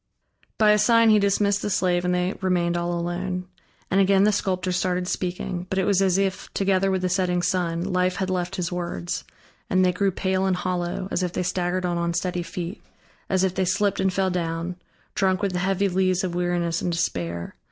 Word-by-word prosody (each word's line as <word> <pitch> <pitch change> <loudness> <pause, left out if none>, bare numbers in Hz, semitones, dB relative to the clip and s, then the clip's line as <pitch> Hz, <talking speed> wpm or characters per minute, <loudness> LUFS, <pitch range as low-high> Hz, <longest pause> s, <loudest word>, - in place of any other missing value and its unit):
By 215 -1 +5
a 210 - +4
sign 230 +1 +5
he 215 - +6
dismissed 200 0 +2
the - - -2
slave, 180 -2 +1
and 180 0 +1
they 180 +2 0
remained 175 -2 +1
all 175 0 -1
alone. 180 +1 -3 0.5
And 195 - +4
again 195 0 +4
the 210 - +5
sculptor 185 -2 -1
started 180 0 0
speaking, 180 0 -3
but 190 - -2
it 190 - +2
was 195 -1 +3
as 190 -1 +3
if, 195 -1 -1
together 195 -1 +2
with 190 -1 0
the - - +2
setting 180 -1 0
sun, 170 -2 0
life 185 -1 0
had 190 -1 -2
left 180 +1 -2
his 180 -1 -2
words; 170 - -4 0.4
and 185 0 +3
they 180 - +4
grew 195 +2 +1
pale 190 0 0
and 190 - +2
hollow, 180 0 -2
as - - 0
if 180 -1 -2
they - - -1
staggered 180 0 -1
on 175 -1 -1
unsteady 175 +1 -1
feet, 175 +3 -6 0.5
as 190 -1 +2
if 190 -2 +1
they 190 - 0
slipped 195 +2 +1
and 190 0 +2
fell 190 0 0
down, 170 0 -2 0.4
drunk 190 0 +1
with 195 -2 0
the 180 - -1
heavy 195 +2 +1
lees 185 0 +1
of 180 -2 -2
weariness 175 -1 0
and 175 - -1
despair. 85 - -2
185 Hz, 210 wpm, -24 LUFS, 175-190 Hz, 0.5 s, he